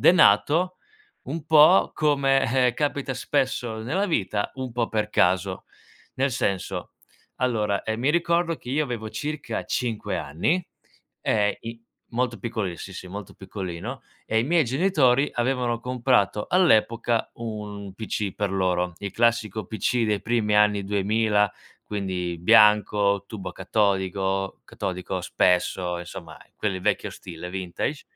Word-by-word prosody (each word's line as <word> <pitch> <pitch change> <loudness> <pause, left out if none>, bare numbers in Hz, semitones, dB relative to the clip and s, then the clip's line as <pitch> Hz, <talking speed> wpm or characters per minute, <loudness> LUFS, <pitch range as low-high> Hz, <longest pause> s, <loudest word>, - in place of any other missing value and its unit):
è - - +7
nato 180 +1 +4 0.5
un 150 +3 -5
po' 155 +3 +6
come, 135 -4 +2
eh, 120 - -2
capita 145 -2 -1
spesso 125 -2 -1
nella 185 - 0
vita, 105 - -1
un 130 -1 -5
po' 115 -1 -1
per 105 0 -1
caso. 95 -2 +1 0.5
Nel 135 +1 +1
senso, 95 -4 -2 0.4
allora, 105 -5 0
ehm, 110 0 -3
mi 130 +5 +2
ricordo 170 0 +1
che 125 - -9
io, 150 +3 +1
avevo 115 -5 -5
circa 150 +6 -4
5 115 -4 -2
anni, 150 - -1 0.6
ehm, 105 -1 +2
i 115 0 -8 0.3
molto 120 0 -1
piccoli 110 -7 -3
sì, 95 - -8
sì, 95 - -8
molto 100 +2 -8
piccolino 95 +5 -6 0.2
e 110 - +1
i - - +3
miei 165 0 +3
genitori, 135 -1 +2
avevano 120 -1 0
comprato 120 -4 +1
all'epoca, 115 -9 +2
un 105 -3 -6
PC 105 -2 -3
per 100 -2 -1
loro. 90 -2 0
Il 100 -1 -5
classico 110 -2 +1
PC 115 +2 0
dei 105 -2 0
primi 110 -3 +1
anni 105 -1 +3
'2000. 105 +1 +1 0.3
Quindi 90 -4 -3
bianco, 100 +1 +4
tubo 95 -4 -7
catodico- 95 -1 0
catodico, 90 0 -4
spesso, 90 0 +1
insomma, 85 -2 -9 0.2
quelli 95 -3 -2
vecchio - - 0
stile, 90 +1 -9
vintage. 95 - -3
110 Hz, 135 wpm, -25 LUFS, 95-130 Hz, 0.6 s, è